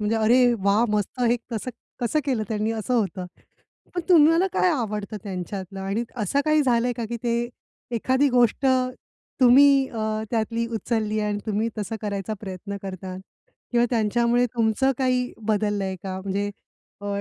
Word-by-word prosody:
म्हणजे 215 +2 0
अरे 240 +3 +4
वाह! 200 +4 +3
मस्त 210 +4 -2
हे 240 0 +3
कसं 230 +2 -3 0.3
कसं 245 +6 +1
केलं 250 -6 0
त्यांनी? 215 0 -1
असं 225 +3 -2
होतं. 190 -5 -1 0.7
पण 355 - 0
तुम्हाला 330 +2 +6
काय 365 - +3
आवडतं 215 -7 -2
त्यांच्यातलं? 190 0 -6
आणि 200 +5 -2
असं 230 +6 0
काही 305 -1 +3
झालंय 245 -1 +2
का 235 - -3
की 235 - -2
ते 235 0 0 0.5
एखादी 260 +5 +2
गोष्ट 245 +2 +3 0.7
तुम्ही 270 +2 +6
अ, 220 -1 -2
त्यातली 230 0 -1
उचलली 220 -1 -1
आणि 210 -1 -1
तुम्ही 215 +2 0
तसं 210 +2 -3
करायचा 205 +1 -3
प्रयत्न 200 0 -6
करतात 185 -1 -6 0.5
किंवा 240 0 +4
त्यांच्यामुळे 235 +2 +2
तुमचं 235 +4 +2
काही 255 -1 +1 0.2
बदललंय 205 -3 0
का? 190 -1 -4
म्हणजे 200 +1 -2 0.5
अ, 205 - -7
225 Hz, 150 wpm, -24 LUFS, 205-245 Hz, 0.7 s, तुम्हाला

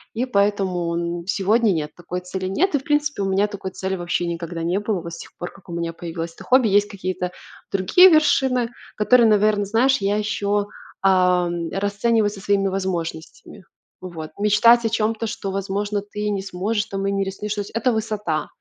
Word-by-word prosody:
И 240 +3 0
поэтому, 195 -6 0 0.2
м, 170 - -11
сегодня- 210 +3 +2
нет, 155 -3 -2
такой 175 +1 -5
цели 185 +1 -5
нет 320 - +1
и, 285 - +2
в - - -15
принципе, 295 -5 0
у - - 0
меня 195 +2 +2
такой 200 -2 -6
цели 190 +1 -3
вообще 175 -1 -2
никогда 170 0 -4
не 175 +4 0
было. 210 -3 -1
Вот 170 0 -8
с - - -7
тех - - -11
пор, 175 - -6
как 190 - -19
у 170 - -6
меня 170 0 -3
появилось 165 0 -6
это - - -13
хобби. 255 -2 +4
Есть 205 0 +3
какие-то 185 -2 -4 0.4
другие 275 - +6
вершины, 265 -6 +3 0.2
которые, 235 +2 +5
наверно, 210 0 +3
знаешь, 245 +6 +3
я 200 +1 0
еще, 205 -1 -1 0.4
а, 180 -2 +4 0.2
расцениваю 205 +2 +1
со 200 -2 -10
своими 195 0 +1
возможностями. 185 -3 -4 0.4
Вот. 165 -4 -7
Мечтать 230 +3 +5
о - - +2
чём-то, 225 +1 -1
что, 200 -2 -4
возможно, 200 +1 -2
ты 210 +1 -5
не 200 -2 -1
сможешь 200 +3 -2
там 195 0 -4
и 200 - +1
не 195 0 0
рискнешь: 200 +2 -4
то 210 - -3
есть 200 - -8
это 230 +2 +1
высота. 210 -8 -2
200 Hz, 195 wpm, -22 LUFS, 180-215 Hz, 0.4 s, другие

